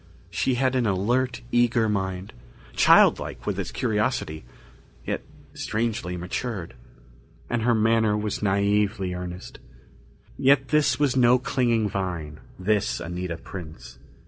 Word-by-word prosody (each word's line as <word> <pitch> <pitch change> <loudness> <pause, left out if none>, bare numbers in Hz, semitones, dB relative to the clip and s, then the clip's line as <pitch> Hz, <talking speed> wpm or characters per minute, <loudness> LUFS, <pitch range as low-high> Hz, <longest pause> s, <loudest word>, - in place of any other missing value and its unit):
She 95 +9 0
had 130 +1 +1
an 125 -3 +2
alert, 120 +6 0
eager 120 -2 +3
mind, 95 -2 -3 0.4
childlike - - +4
with - - -2
its - - -3
curiosity, 105 -8 -1 0.6
yet - - -2 0.3
strangely 110 -6 -2
matured. 90 +1 -4 0.8
And 120 -1 0
her 120 +1 +3
manner 110 -1 +3
was 105 -1 -2
naïvely 100 -1 +1
earnest. 90 0 -7 0.8
Yet 135 0 +4
this 150 -1 +2
was 145 -3 +2
no 125 -1 +5
clinging 120 -4 +1
vine, 90 -7 -4 0.2
this 95 - 0
Anita 90 +1 -4
Prince. 80 -9 -10
105 Hz, 120 wpm, -25 LUFS, 90-120 Hz, 0.8 s, no